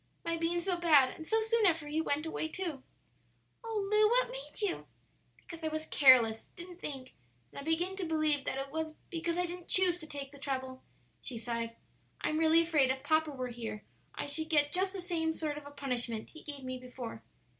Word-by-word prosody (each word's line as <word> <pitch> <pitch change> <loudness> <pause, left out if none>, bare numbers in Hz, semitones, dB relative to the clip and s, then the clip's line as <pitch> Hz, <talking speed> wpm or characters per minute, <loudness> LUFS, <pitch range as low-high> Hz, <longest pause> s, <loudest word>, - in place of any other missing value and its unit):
my 335 0 +1
being 335 +1 0
so 355 0 -1
bad; 295 -7 +5
and 315 - -9
so 445 - +3
soon 445 -1 +3
after 325 -4 +1
he 305 +2 0
went 300 0 0
away, 320 0 -2
too." 325 -5 -4 0.8
"Oh, 435 -3 -2
Lu, 425 0 +6
what - - +3
made - - -6
you?" 410 -4 -1 0.5
"Because 335 -1 -11
I - - 0
was 310 0 -3
careless; 245 -7 +6
didn't 355 0 -9
think; 265 -3 -5 0.4
and - - -8
I - - -5
begin 330 +5 0
to 375 - -2
believe 310 -3 +1
that - - -1
it 270 0 -4
was 315 0 -3 0.2
because 335 0 -1
I 360 - +2
didn't 355 0 -7
choose 360 -2 +4
to 315 - -8
take 280 -2 -6
the 285 - -13
trouble," 260 -2 -3 0.4
she 245 - -4
sighed. 230 0 -3 0.4
"I'm 310 - 0
really 325 +1 +5
afraid 305 -6 +3
if 265 +1 -1
papa 315 +1 +3
were 255 -3 -4
here 225 -3 -6 0.3
I - - -3
should 315 +2 -3
get 295 -2 +3
just 375 +1 +3
the 385 - -4
same 325 -3 0
sort 305 -2 -2
of 285 - -13
a - - -7
punishment 245 -6 -3
he 315 - -12
gave 285 -3 -7
me 255 0 -4
before. 250 -3 -7
315 Hz, 210 wpm, -32 LUFS, 270-345 Hz, 0.8 s, Lu